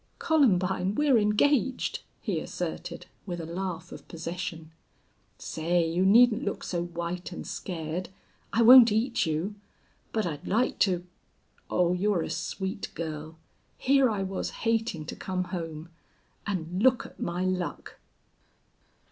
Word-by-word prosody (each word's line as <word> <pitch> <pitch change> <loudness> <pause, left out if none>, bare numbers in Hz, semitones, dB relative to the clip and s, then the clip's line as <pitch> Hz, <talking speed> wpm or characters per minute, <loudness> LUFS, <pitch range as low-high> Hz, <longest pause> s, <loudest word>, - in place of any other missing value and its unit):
"Columbine, 195 - +2
we're 280 -4 +4
engaged," 255 +6 +2 0.2
he - - -1
asserted, - - -5 0.2
with 175 -2 -4
a 165 - -5
laugh 175 0 -5
of - - -10
possession. 165 -1 -6 0.7
"Say, 170 +1 0
you 170 +3 +1
needn't 230 +2 +6
look 200 - -3
so 175 -1 -2
white 175 +1 -5
and 175 - -7
scared. 170 0 -4 0.4
I 230 - +3
won't 240 -1 +10
eat 225 -1 +1
you. 160 +6 -1 0.6
But 220 -1 0
I'd 150 -4 -5
like 235 +5 +1
to.... 180 -3 +2 0.6
Oh, 180 0 +2
you're 185 -1 +1
a - - -4
sweet 190 +4 -4
girl! 155 0 -5 0.4
Here 270 -1 +4
I 205 -3 -1
was 190 0 -3 0.2
hating 225 -8 0
to - - -6
come 185 -1 -2
home. 165 -2 -5 0.6
And 180 -2 -2
look 255 +1 +4
at - - -13
my 175 +2 -2
luck!" 185 -1 -3
185 Hz, 135 wpm, -28 LUFS, 170-215 Hz, 0.7 s, won't